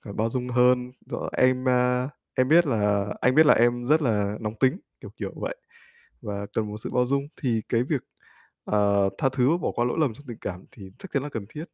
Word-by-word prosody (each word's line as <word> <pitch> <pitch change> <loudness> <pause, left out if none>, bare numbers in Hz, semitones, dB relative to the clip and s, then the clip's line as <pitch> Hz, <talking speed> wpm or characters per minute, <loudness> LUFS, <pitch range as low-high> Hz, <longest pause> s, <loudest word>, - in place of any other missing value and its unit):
bao 110 +1 0
dung 125 +1 -2
hơn." 125 0 +3 0.2
rồi - - -4
"em, 130 0 +3
a, 125 +1 +2 0.3
em 130 - +3
biết 170 +3 +5
là 105 -5 +1 0.2
anh 130 0 +3
biết 155 - +7
là 150 - +7
em 120 +1 +2
rất 155 +5 +3
là 105 -5 0
nóng 105 -1 -4
tính" 135 +8 +2 0.2
kiểu, - - -9
kiểu - - -4
vậy, - - -4 0.7
và 100 -2 -5
cần 110 -1 -1
một 105 - -6
sự - - -5
bao 125 0 +2
dung. 140 +2 0
Thì 120 -5 +1
cái 115 0 +2
việc, 135 +1 -2 0.6
ờ, 100 -1 +2
tha 135 - +2
thứ 130 0 +2
và 165 - +3
bỏ - - -1
qua 120 - +1
lỗi 120 - -1
lầm 140 -8 +1
trong 145 +4 -16
tình 120 - -7
cảm 90 -1 -6
thì 95 -3 -12
chắc 195 - -8
chắn 140 - 0
là 145 - -4
cần 115 -8 -6
thiết. 150 +7 -7
125 Hz, 235 wpm, -25 LUFS, 110-135 Hz, 0.7 s, biết